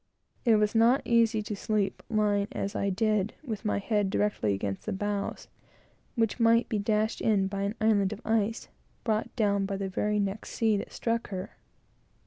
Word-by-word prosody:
It 230 Hz, -2 st, +6 dB
was 210 Hz, 0 st, +2 dB
not 235 Hz, +4 st, +4 dB
easy 230 Hz, -2 st, +3 dB
to 210 Hz, 0 st, -4 dB
sleep, 205 Hz, -1 st, -1 dB
lying, 205 Hz, -2 st, +1 dB
as 200 Hz, +1 st, -3 dB
I 200 Hz, -, 0 dB
did, 215 Hz, +1 st, 0 dB
with 225 Hz, -7 st, -5 dB
my 210 Hz, -, 0 dB
head 205 Hz, -1 st, 0 dB
directly 190 Hz, -, 0 dB
against 95 Hz, 0 st, -4 dB
the -, -, 0 dB
bows, 205 Hz, +1 st, -3 dB, 0.7 s
which 225 Hz, -1 st, 0 dB
might 230 Hz, +1 st, +4 dB
be 215 Hz, -, -1 dB
dashed 215 Hz, +1 st, 0 dB
in 205 Hz, -3 st, +2 dB
by 195 Hz, +1 st, -3 dB
an 200 Hz, +2 st, -1 dB
island 210 Hz, -3 st, +3 dB
of 215 Hz, -, -5 dB
ice, 225 Hz, 0 st, 0 dB, 0.4 s
brought 220 Hz, -2 st, 0 dB
down 200 Hz, -3 st, +1 dB
by 195 Hz, -1 st, -3 dB
the 195 Hz, -1 st, -3 dB
very 210 Hz, +2 st, 0 dB
next 200 Hz, +1 st, -3 dB
sea 220 Hz, -2 st, +2 dB
that -, -, -6 dB
struck 230 Hz, 0 st, -1 dB
her. 185 Hz, -1 st, -5 dB
210 Hz, 180 wpm, -28 LUFS, 200-225 Hz, 0.7 s, It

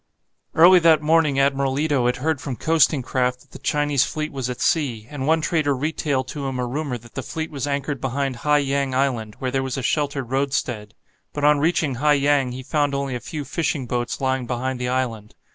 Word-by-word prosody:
Early 180 Hz, +3 st, +8 dB
that 160 Hz, -3 st, +4 dB
morning 155 Hz, -3 st, +3 dB
Admiral 135 Hz, -1 st, +1 dB
Ito 145 Hz, -5 st, +1 dB
had 125 Hz, -, +1 dB
heard 155 Hz, +1 st, -1 dB
from 135 Hz, -4 st, -4 dB
coasting 155 Hz, -2 st, +2 dB
craft 125 Hz, 0 st, -1 dB
that -, -, -24 dB
the 135 Hz, -, -11 dB
Chinese 145 Hz, -1 st, +1 dB
fleet 155 Hz, 0 st, -3 dB
was 130 Hz, -3 st, -3 dB
at 125 Hz, -, -5 dB
sea, 125 Hz, -9 st, 0 dB
and 140 Hz, -2 st, -4 dB
one 160 Hz, +1 st, +3 dB
trader 150 Hz, -3 st, +1 dB
retailed 140 Hz, -2 st, -1 dB
to 140 Hz, -2 st, -4 dB
him 130 Hz, -1 st, -3 dB
a 125 Hz, -, -1 dB
rumour 135 Hz, 0 st, -3 dB
that 120 Hz, 0 st, -17 dB
the -, -, -4 dB
fleet 160 Hz, +5 st, -5 dB
was 145 Hz, -1 st, -3 dB
anchored 140 Hz, -1 st, -2 dB
behind 135 Hz, 0 st, -2 dB
Hai 150 Hz, +4 st, +2 dB
Yang 140 Hz, -2 st, 0 dB
island, 120 Hz, -6 st, -1 dB
where 130 Hz, -1 st, -3 dB
there 135 Hz, +1 st, 0 dB
was 130 Hz, 0 st, -3 dB
a 135 Hz, -, -3 dB
sheltered 140 Hz, -3 st, -1 dB
roadstead. 125 Hz, -6 st, -2 dB, 0.4 s
But 145 Hz, -, -4 dB
on 150 Hz, 0 st, +5 dB
reaching 160 Hz, -2 st, +1 dB
Hai 150 Hz, 0 st, +5 dB
Yang 140 Hz, -3 st, +2 dB
he 130 Hz, +1 st, -7 dB
found 145 Hz, +1 st, 0 dB
only 140 Hz, -1 st, -2 dB
a 125 Hz, -, -3 dB
few 145 Hz, +5 st, -6 dB
fishing 150 Hz, 0 st, -2 dB
boats 120 Hz, 0 st, -2 dB
lying 130 Hz, -2 st, -1 dB
behind 130 Hz, +1 st, -2 dB
the 125 Hz, 0 st, -2 dB
island. 115 Hz, -5 st, -2 dB
135 Hz, 215 wpm, -22 LUFS, 125-150 Hz, 0.4 s, Early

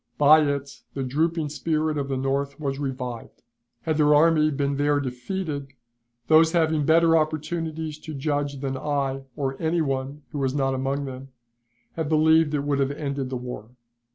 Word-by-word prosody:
By 150 Hz, +2 st, +7 dB
it 140 Hz, -2 st, -2 dB
the 135 Hz, -, -2 dB
drooping 155 Hz, +4 st, 0 dB
spirit 155 Hz, 0 st, -1 dB
of 140 Hz, -2 st, -2 dB
the 135 Hz, -1 st, -2 dB
North 140 Hz, +2 st, -2 dB
was 140 Hz, -2 st, -3 dB
revived. 125 Hz, -4 st, -5 dB, 0.4 s
Had 160 Hz, -2 st, 0 dB
their 150 Hz, -1 st, +5 dB
army 155 Hz, 0 st, +4 dB
been 140 Hz, -1 st, -1 dB
there 145 Hz, 0 st, +2 dB
defeated, 140 Hz, +2 st, -4 dB, 0.5 s
those 160 Hz, +3 st, +5 dB
having 160 Hz, -3 st, +2 dB
better 165 Hz, +1 st, +5 dB
opportunities 155 Hz, 0 st, -2 dB
to 155 Hz, -1 st, -8 dB
judge 145 Hz, -1 st, -2 dB
than 135 Hz, -1 st, -2 dB
I 135 Hz, -1 st, -2 dB
or 135 Hz, -1 st, -3 dB
any 165 Hz, +1 st, +1 dB
one 135 Hz, 0 st, -3 dB
who 150 Hz, -, -4 dB
was 135 Hz, 0 st, 0 dB
not 135 Hz, -2 st, +1 dB
among 135 Hz, +2 st, -2 dB
them, 130 Hz, 0 st, -7 dB, 0.7 s
have 160 Hz, -3 st, -2 dB
believed 160 Hz, 0 st, +4 dB
it 140 Hz, -, -1 dB
would 145 Hz, -1 st, 0 dB
have 135 Hz, -1 st, +2 dB
ended 140 Hz, -3 st, -3 dB
the 130 Hz, -, -3 dB
war. 125 Hz, -3 st, -7 dB
145 Hz, 170 wpm, -25 LUFS, 135-155 Hz, 0.7 s, By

